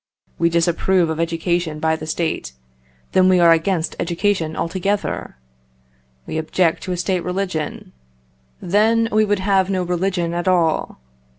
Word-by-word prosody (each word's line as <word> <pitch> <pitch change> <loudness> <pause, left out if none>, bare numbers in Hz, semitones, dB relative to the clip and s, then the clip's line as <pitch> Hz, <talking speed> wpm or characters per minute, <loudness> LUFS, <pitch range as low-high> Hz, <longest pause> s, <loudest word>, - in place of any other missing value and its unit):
We 170 - +3
disapprove 170 +1 +1
of 160 - -4
education 165 -1 -1
by 160 0 +1
the 155 0 -8
State 160 - -2 0.6
then 185 0 +4
we 185 -1 +4
are 170 -1 +6
against 165 0 +1
education 170 -2 -1
altogether. 190 - -2 0.9
We 160 - -3
object 160 +1 0
to 185 - -4
a 180 - -2
State 180 0 -1
religion 180 -4 -4 0.7
then 225 +5 +2
we 215 0 +3
would 205 0 +1
have 190 -1 +1
no 185 -2 0
religion 180 -1 -1
at 175 +1 -3
all. 170 -4 +1
175 Hz, 140 wpm, -20 LUFS, 165-190 Hz, 0.9 s, are